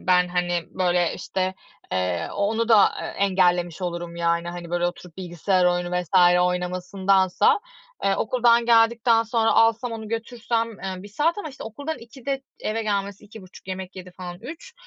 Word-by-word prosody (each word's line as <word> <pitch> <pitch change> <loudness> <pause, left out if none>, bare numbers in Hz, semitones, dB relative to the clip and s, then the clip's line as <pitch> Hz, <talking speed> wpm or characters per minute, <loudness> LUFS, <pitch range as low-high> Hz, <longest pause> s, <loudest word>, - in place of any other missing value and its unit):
ben, 180 -1 +3
hani, 175 -1 0
böyle, 180 -2 +1
işte, 185 0 -2 0.4
eee, 90 -2 -1
o - - -9
onu 230 +1 -1
da, 210 -4 +7
eee, - - -4
engellemiş 180 -3 +1
olurum. 175 -1 -4
Yani, 170 0 0
hani, 175 -1 -7
böyle 175 0 +1
oturup 175 -1 -7
bilgisayar 185 +1 0
oyunu 175 0 +1
vs. 180 +1 +5
oynamasındansa, 185 - +2 0.4
eee, 195 - +3
okuldan 235 0 +3
geldikten 230 0 +4
sonra 225 0 +1
alsam 230 +1 +3
onu 220 -1 -6
götürsem, 230 0 -2
eee, 190 -1 -5
1 205 - -10
saat 305 - 0
ama, 330 - -5
işte, 275 - -10
okuldan 285 +8 -5
2'de 265 +3 -5 0.2
eve 225 +1 -2
gelmesi 200 -2 -2
2.30 195 -3 -14
yemek 190 0 -6
yedi 185 -1 -9
falan 180 -1 -8
3. 330 - -10
190 Hz, 160 wpm, -24 LUFS, 180-225 Hz, 0.4 s, da